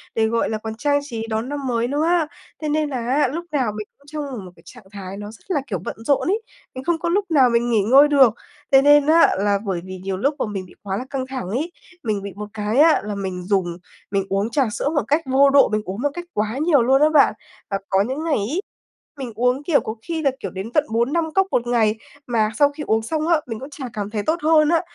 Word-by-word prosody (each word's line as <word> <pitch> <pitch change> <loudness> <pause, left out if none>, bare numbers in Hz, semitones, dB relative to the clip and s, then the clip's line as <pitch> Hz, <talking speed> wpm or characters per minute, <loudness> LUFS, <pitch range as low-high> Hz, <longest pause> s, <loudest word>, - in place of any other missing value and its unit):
để, 220 -1 +2
gọi 230 +1 0
là, 220 - -1
còn 220 0 -6
trang 285 +5 +1
trí 230 -5 -5
đón 220 +3 -2
năm 285 -2 -4
mới 235 -1 0
nữa 290 +4 0
á, 340 -2 +2 0.3
thế 305 - -2
nên 305 0 0
là 265 - -3
á, 255 +5 +1
lúc 340 +2 -4
nào 255 -7 0
mình 210 -1 -6
cũng 280 - -26
trong 300 0 -5
một 250 - -5
một 180 - -11
cái - - -21
trạng 245 -3 -13
thái 195 -1 -7
nó 205 +1 -7
rất 225 - -17
là, 290 - +1
kiểu, 190 -7 -3
bận - - -4
rộn 280 +1 +2
ấy, 415 +5 +1 0.3
mình 260 - -6
không 335 +2 0
có 340 - -2
lúc 400 +4 +1
nào 270 -5 +5
mình 235 0 +1
nghỉ 220 -3 +3
ngơi 265 +8 +6
được. 270 -6 +5 0.4
Thế 270 -1 +7
nên 290 0 +6
á, 325 +2 +5
là 200 0 +2
bởi 185 -4 -2
vì 185 0 -7
nhiều 195 -1 -2
lúc 280 +9 0
bọn 210 - -3
mình 190 -1 -4
bị 180 - -17
quá 195 -1 -2
là 250 - -5
căng 265 -2 -3
thẳng 260 -8 -5
ấy, 285 - -2 0.3
mình 215 -4 -1
bị 200 -1 -7
một 210 0 -6
cái 215 +2 -2
á 315 +1 +6
là 210 0 -4
mình 190 -2 -4
dùng 180 -3 0 0.3
mình 195 -1 0
uống 195 +3 0
trà 270 +4 +2
sữa 280 - -1
một 290 - +3
cách 300 +3 +2
vô 270 +1 +4
độ, 275 0 +5
mình 215 0 0
uống 195 +5 -5
một 290 - +1
cách 350 +2 -6
quá 215 +3 -1
nhiều 300 -2 +3
luôn 265 +4 +3
á 305 - +6
bạn 300 -7 +5 0.4
và 195 - 0
có 190 0 +3
những 260 +9 -2
ngày 325 -2 +1
ấy, 265 - -2 0.6
mình 255 -3 -5
uống, 250 +4 +1
kiểu, 295 -1 +3
có 220 - -5
khi 330 -1 -2
là, 280 -3 +2
kiểu, 195 - -5
đến 195 +4 -6
tận 300 -1 +3
4-5 300 +8 0
cốc 385 +1 +3
1 240 0 0
ngày, 220 -3 +2 0.3
mà 220 -3 +1
sau 285 -1 +5
khi 295 +1 -7
uống 220 0 +2
xong 310 +7 -2
á, 335 -3 +3
mình 225 -2 -5
cũng 270 - -8
chả 290 -2 -7
cảm 205 -1 -4
thấy 210 -1 -3
tốt 320 +7 0
hơn 310 -1 +4
á. 335 -1 +3
250 Hz, 275 wpm, -21 LUFS, 210-295 Hz, 0.6 s, Thế